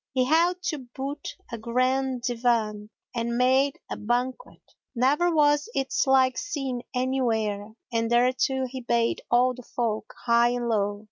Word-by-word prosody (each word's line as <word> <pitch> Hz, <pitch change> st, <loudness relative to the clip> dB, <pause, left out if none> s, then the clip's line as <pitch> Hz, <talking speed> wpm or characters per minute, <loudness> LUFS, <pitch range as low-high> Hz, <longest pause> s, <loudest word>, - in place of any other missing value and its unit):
He 255 Hz, -1 st, +2 dB
held 345 Hz, +5 st, +2 dB
to 305 Hz, -5 st, -2 dB
boot 270 Hz, +3 st, -6 dB, 0.2 s
a 230 Hz, -, -5 dB
grand 255 Hz, +2 st, 0 dB
Divan 230 Hz, -4 st, 0 dB, 0.2 s
and 235 Hz, 0 st, -2 dB
made 260 Hz, +2 st, +3 dB
a -, -, -5 dB
banquet, 245 Hz, +4 st, -3 dB, 0.3 s
never 285 Hz, +8 st, +3 dB
was 295 Hz, +3 st, +3 dB
its 270 Hz, 0 st, 0 dB
like 260 Hz, -1 st, +4 dB
seen 270 Hz, -7 st, -3 dB
anywhere 225 Hz, -5 st, -1 dB, 0.2 s
and 230 Hz, 0 st, 0 dB
thereto 255 Hz, +2 st, +2 dB
he 260 Hz, +1 st, -6 dB
bade 235 Hz, -1 st, 0 dB
all 250 Hz, +1 st, +4 dB
the 250 Hz, -, -10 dB
folk, 230 Hz, -3 st, -3 dB
high 235 Hz, 0 st, +4 dB
and 240 Hz, -1 st, -2 dB
low. 205 Hz, -2 st, 0 dB
250 Hz, 145 wpm, -26 LUFS, 235-265 Hz, 0.3 s, like